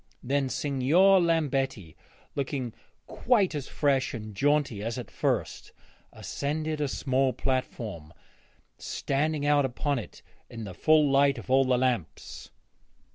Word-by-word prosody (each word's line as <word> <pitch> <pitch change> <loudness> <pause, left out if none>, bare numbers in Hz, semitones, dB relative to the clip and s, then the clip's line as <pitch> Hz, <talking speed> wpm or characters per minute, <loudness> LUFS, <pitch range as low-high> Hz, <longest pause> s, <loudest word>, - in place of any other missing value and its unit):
Then 135 +1 0
Signor 150 +10 +3
Lambetti, 135 - -1 0.4
looking 135 -4 -3 0.3
quite 210 -8 +1
as 145 -3 -4
fresh 135 -3 0
and 110 -2 -7
jaunty 140 -2 +1
as 115 +3 -3
at 125 - -7
first, - - -2 0.4
ascended 155 +1 -3
a 145 - +1
small 130 -1 0
platform, 110 - -3 0.7
standing 145 +1 -1
out 145 -1 +4
upon 135 +2 -1
it 115 - -11 0.3
in 115 -1 -8
the 95 -3 -7
full 155 - +3
light 140 0 +4
of 120 - -7
all 135 0 +5
the 130 -1 +2
lamps. 125 -8 -3
135 Hz, 130 wpm, -27 LUFS, 125-145 Hz, 0.7 s, all